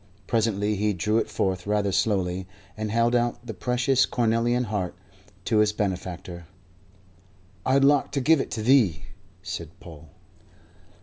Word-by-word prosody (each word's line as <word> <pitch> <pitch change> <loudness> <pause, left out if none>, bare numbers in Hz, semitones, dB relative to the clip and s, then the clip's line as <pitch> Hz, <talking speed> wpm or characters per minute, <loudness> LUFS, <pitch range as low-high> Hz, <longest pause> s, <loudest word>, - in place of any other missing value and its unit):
Presently 105 -2 0
he 105 +1 +1
drew 105 +5 +1
it - - -2
forth 95 -1 -2
rather 105 -1 +1
slowly, 95 -3 0 0.3
and 110 0 -4
held 115 +2 +2
out 120 0 0
the 115 - -5
precious 125 +5 +1
cornelian 120 +1 +1
heart 105 -6 -3 0.5
to 110 -2 +2
his 105 0 +3
benefactor. 90 -4 -4 1.2
"I 130 - +3
'ud 140 - +4
like 145 0 +4
to 140 - +1
give 150 +2 +4
it - - -5
thee," 110 - +2 0.4
said 90 -5 -7
Paul. 80 -3 -13
105 Hz, 140 wpm, -25 LUFS, 95-120 Hz, 1.2 s, ud